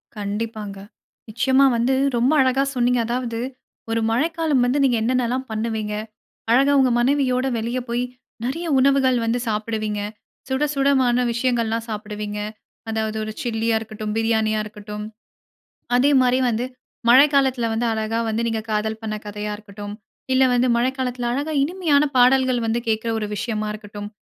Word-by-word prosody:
கண்டிப்பாங்க. 210 0 -4 0.5
நிச்சயமா 260 +5 +3
வந்து 240 +3 +2 0.2
ரொம்ப 245 +4 +3
அழகாக 265 +1 +2
சொன்னீங்க. 245 0 +2
அதாவது 240 -1 -2 0.5
ஒரு 230 0 +1
மழைக்காலம் 310 0 +1
வந்து, 250 +3 +1
நீங்க 260 -3 +3
என்னென்னல்லாம் 255 +2 0
பண்ணுவீங்க? 220 -1 -2 0.6
அழகா 270 +4 +5
உங்க 260 -2 +4
மனைவியோட 260 0 +2
வெளிய 235 +3 -2
போய், 240 +1 0 0.4
நிறைய 330 +7 -3
உணவுகள் 265 -1 +3
வந்து 230 +2 0
சாப்பிடுவீங்க, 215 -1 -2 0.5
சுடசுடமான 270 -3 +2
விஷயங்கள்லாம் 230 -2 0
சாப்பிடுவீங்க. 210 -1 -5 0.5
அதாவது 220 0 -2
ஒரு 215 - -4
சில்லியா 225 -1 0
இருக்கட்டும், 215 -1 -5
பிரியாணியா 220 -1 +1
இருக்கட்டும். 210 0 -7 0.9
அதேமாரி 255 -1 +4
வந்து 235 +1 0 0.4
மழைக்காலத்தில 265 -2 +5
வந்து 230 +2 0
அழகா 220 +1 -1
வந்து 220 +1 -1
நீங்க 225 -1 -1
காதல் 215 +1 -1
பண்ண 215 -1 -3
கதையா 210 0 -4
இருக்கட்டும், 205 -1 -9 0.4
இல்ல 260 0 +5
வந்து 245 +1 +3
மழைக்காலத்தில 250 0 -1
அழகா 290 +5 -2
இனிமையான 315 -3 +2
பாடல்கள் 255 0 +4
வந்து 225 +1 0
கேட்கிற 220 +1 0
ஒரு 215 - -2
விஷயமா 215 -1 -2
இருக்கட்டும். 205 -1 -8
235 Hz, 130 wpm, -22 LUFS, 220-260 Hz, 0.9 s, அழகா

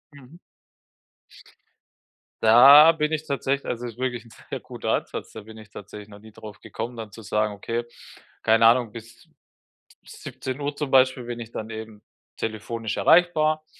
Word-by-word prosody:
Mhm. 140 +4 -16 2.1
Da 140 +8 +8
bin 150 -1 -2
ich 155 0 -3
tatsächlich 140 0 -2
also, 120 0 -4
es 120 - -5
ist 120 - -22
wirklich 125 -2 -3
ein 115 - -18 0.2
sehr - - -4
guter - - -7
Ansatz, - - -4
da 110 - -9
bin 110 +1 -13
ich 110 - -15
tatsächlich 105 +1 -11
noch 100 - -13
nie 110 +1 -16
darauf 105 -1 -12
gekommen, 120 +1 -7
dann 110 -2 -8
zu 115 - -12
sagen: 105 0 -1
„Okay, 115 +4 -4 0.6
keine 115 0 +3
Ahnung, 120 -1 +4
bis 115 +1 -13
d - - -34 0.8
17:00 140 +2 -6
zum 150 -2 -3
Beispiel 130 -1 +3
bin 120 0 -6
ich 115 0 -10
dann 110 -1 -7
eben 110 -1 -9 0.4
telefonisch 110 0 -4
erreichbar 155 -2 +3
115 Hz, 165 wpm, -24 LUFS, 110-140 Hz, 2.1 s, Da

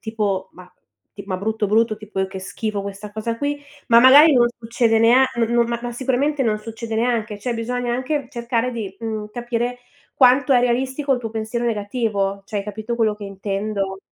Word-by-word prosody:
tipo 210 -4 -2
ma 180 0 -13 0.5
ti 200 - -8
ma, 185 - -2
brutto, 215 +2 -1
brutto 220 +1 +2
tipo: 210 -2 -8
"Eh, 190 - +1
che 190 -1 -7
schifo 210 +2 -4
questa 200 +1 -7
cosa 225 +2 -3
qui." 285 +1 -2 0.3
Ma 235 -1 +7
magari 285 +5 +8
non 240 -1 +5
succede 230 -1 +1
nea 240 +4 +6
no 235 - +2
non 235 +1 +2
ma 235 0 -2
ma 240 0 -4
sicuramente 265 +3 0
non 215 -3 +1
succede 225 +1 -6
neanche, 225 -3 -1
cioè 240 +3 -3
bisogna 240 +1 -2
anche 265 +2 -2
cercare 235 +1 -1
di, 210 -5 -5
mhmm, 215 -2 -4
capire 240 +1 -2 0.4
quanto 260 +1 +5
è 250 - +5
realistico 260 +3 0
il 245 - -4
tuo 225 - -5
pensiero 225 +2 -3
negativo, 205 -3 -1
cioè 210 -1 -3
hai 200 - -4
capito 215 +3 -5
quello 220 -2 +2
che 210 0 -9
intendo? 195 0 -3
230 Hz, 195 wpm, -21 LUFS, 210-245 Hz, 0.5 s, magari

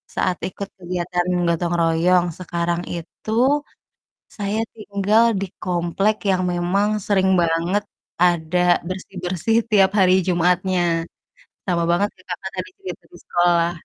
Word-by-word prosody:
saat 180 - 0
ikut 200 +1 -6
kegiatan 175 0 -2 0.2
gotong 170 0 0
royong. 170 +2 +3
Sekarang 170 -1 -2
itu 170 +5 -7 1.1
saya 205 +1 -1 0.2
tinggal 210 +1 +2 0.2
di 195 - -2 0.2
komplek 180 +4 0
yang 185 -1 +2
memang 180 +4 +1 0.2
sering 190 -2 +3
banget 170 +4 +1 0.4
ada 175 -1 +2 0.3
bersih-bersih 185 +2 -3 0.2
tiap 195 -2 +5
hari 185 -2 +5
Jumatnya, 180 +1 +2 0.9
sama 175 -2 +1
banget 175 +4 +2
kayak 185 - -22
Kakak 190 +2 -4
tadi 415 - -4
cerita 385 - -7
di - - -13
sekolah, 175 -1 +2
180 Hz, 120 wpm, -21 LUFS, 175-195 Hz, 1.1 s, tiap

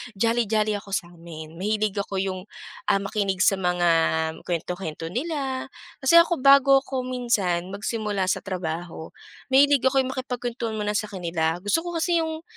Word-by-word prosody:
jolly 230 +3 +2
jolly 215 0 +1
ako 200 -1 -8
sa'min, 165 -3 -6
mahilig 210 +2 -1
ako 200 -1 -3
yung, 190 -1 -3 0.5
ah, 195 - +3
makinig 200 -1 -2
sa 195 - +4
mga 180 -1 +1 0.6
kuwento-kuwento 170 -1 -4
nila. 270 -1 -3 0.4
Kasi 335 +6 +7
ako 335 +1 +3
bago 275 0 +7
ako 260 -2 -4
minsan 195 -8 -1
magsimula 205 -2 -2
sa - - +1
trabaho, 170 -3 -5 0.5
mahilig 280 +1 +6
ako 270 +1 +3
yung 260 - -4
makipagkwentuhan 245 -3 -4
muna 210 0 -1
sa 215 - -2
kanila, 165 -3 -1
gusto 205 +9 +2
ko 345 -1 -4
kasi 340 +1 +2
yung 320 0 -5
210 Hz, 155 wpm, -24 LUFS, 180-260 Hz, 0.6 s, Kasi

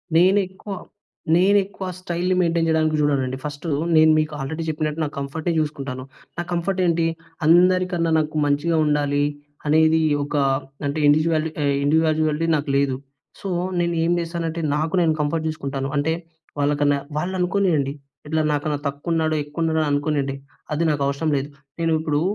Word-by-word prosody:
నేను 185 +4 +5
ఎక్కువ 190 +2 -8 0.6
నేను 195 +3 +5
ఎక్కువ 195 -1 -8
స్టైల్‌ని 180 0 -1
మెయిన్‌టైన్ 165 -1 +1
చేయడానికి 155 -1 +2
చూడనండి. 135 -3 +1
ఫస్ట్ 145 +2 -6 0.3
నేను 155 0 +6
మీకు 155 0 -1
ఆల్రెడీ 160 +4 -4
చెప్పినట్టు 155 0 -2
నాకు 150 - -4
కంఫర్ట్ 140 +4 -5
చూసుకుంటాను. 140 -4 -3 0.3
నా - - 0
కంఫర్ట్ 175 +2 -1
ఏంటి 165 -1 +2 0.4
అందరికన్నా 175 0 +4
నాకు 155 0 -2
మంచిగా 145 +3 +1
ఉండాలి. 145 -1 +1 0.4
అనేది 160 +1 +4 0.2
ఒక 145 +1 -5 0.5
అంటే 140 +2 -1
ఇండివిడ్యవాలి 155 +1 +3 0.3
ఇండివిడ్యువాలిటీ 155 +1 +2
నాకు 145 0 -2
లేదు. 140 -2 +1 0.4
సో, 195 - -5 0.3
నేను 170 0 0
ఏం 170 - +1
చేశానంటే 165 -1 -3
నాకు 155 +3 -1
నేను 160 -2 +3
కంఫర్ట్ 155 +2 -1
చూసుకుంటాను. 135 -3 -3
అంటే 145 +3 +1 0.5
వాళ్ళకన్నా 145 0 +2 0.2
వాళ్ళు 180 +4 -2
అనుకోనియండి. 175 -7 +1 0.3
ఇట్లా 155 +1 +1
నాకన్నా 150 0 -1
తక్కువ 145 +4 -4
ఉన్నాడో, 160 -1 +1
ఎక్కు 145 +2 -18
ఉన్నాడో 160 -1 +1
అనుకోనియండి. 145 -2 0 0.4
అది 155 - 0
నాకు 145 -1 -1
అవసరం 140 +3 -1
లేదు. 140 +2 -3 0.3
నేను 165 -1 +1
ఇప్పుడు 150 -2 0
155 Hz, 150 wpm, -22 LUFS, 145-170 Hz, 0.6 s, నేను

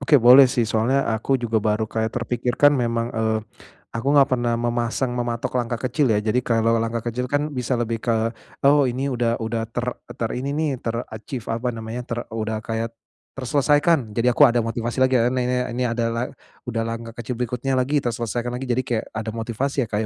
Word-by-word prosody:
Oke, 140 +2 +2
boleh, 125 +3 +9
sih, 120 -1 +1
soalnya 115 +5 +2 0.2
aku 110 +4 -4
juga 115 -1 0
baru 105 +1 +1
kayak 110 0 -1
terpikirkan 125 +4 +2
memang, 115 -3 0
eee, 110 0 +1 0.6
aku 115 +3 -3
enggak 140 -2 +6
pernah 120 -1 0
memasang 120 +1 -1
mematok 120 -1 -2
langkah 120 0 -2
kecil, 135 +3 +1
ya, 105 - +3
jadi 110 +4 +3
kalau 115 -1 +2
langkah 115 0 -2
kecil 125 +2 -2
kan 145 - +3
bisa 125 -2 -1
lebih 115 -1 -1
ke 120 - +1 0.5
oh 145 +1 +6
ini 130 +3 -2
udah 120 -2 +1
udah 115 0 -2
ter 120 +1 -2 0.3
terini, 125 +4 -2
nih, 155 0 +1
ter-achieve 115 +1 -5
apa 120 +2 -3
namanya 115 +2 -5
ter 120 - -3
udah 110 -1 -2
kayak 115 +1 -3 0.5
terselesaikan 140 -2 +2
jadi 125 +2 +3
aku 145 - +6
ada 120 0 +2
motivasi 115 +2 -3
lagi, 130 0 +2
ya, 115 - +3
ni 130 -1 0
ni 125 0 +1 0.2
ini 125 - 0
adalah 115 0 -1 0.4
udah 115 -2 -1
langkah 115 0 -5
kecil 120 +2 -4
berikutnya 125 +2 -1
lagi, 135 +3 +2
terselesaikan 120 +1 -2
lagi 125 - -5
jadi 125 +1 +1
kayak 115 -3 -1
ada 110 0 -4
motivasi, 115 +4 -2
ya, - - -6
Kak, 105 - 0
120 Hz, 190 wpm, -23 LUFS, 115-125 Hz, 0.6 s, boleh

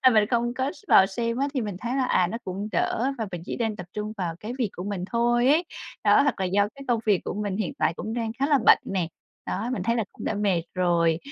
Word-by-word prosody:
A, 255 - +6
mình 215 -3 +5
không 240 0 +1
có 260 +2 -1
s - - -17
vào 190 - +7
xem 230 +4 -2
á 275 - +1
thì 265 - +1
mình 205 -5 -4
thấy 245 +2 -2
là, 265 - +2
à, 185 -7 +3
nó 225 +6 -4
cũng 195 +3 -4
đỡ 250 +9 +1
và 225 - -2
mình 175 -2 -5
chỉ - - -4
nên 225 -3 -1
tập 180 -4 -8
trung 210 0 -4
vào 175 -4 -2
cái 220 +3 -5
việc 235 -6 0
của 180 - -5
mình 200 -3 -3
thôi 240 +1 +2
ấy. 315 +5 +4 0.4
Đó, - - +6
hoặc 280 -8 0
là - - +1
do 200 +3 +2
cái 275 - -10
công 235 -2 +2
việc 200 -4 +4
của - - -3
mình 205 -1 -2
hiện 210 -5 -2
tại - - +2
cũng 220 +6 -5
đang 230 -2 -2
khá 275 - +2
là 290 -1 +4
bận - - +8
nè. 185 -4 -1 0.4
Đó, 225 +4 -2
mình 210 -8 -2
thấy 230 +4 +1
là 225 - 0
cũng - - -9
đã - - -1
mệt 200 -5 +1
rồi. 170 -3 +2
215 Hz, 285 wpm, -26 LUFS, 190-240 Hz, 0.4 s, bận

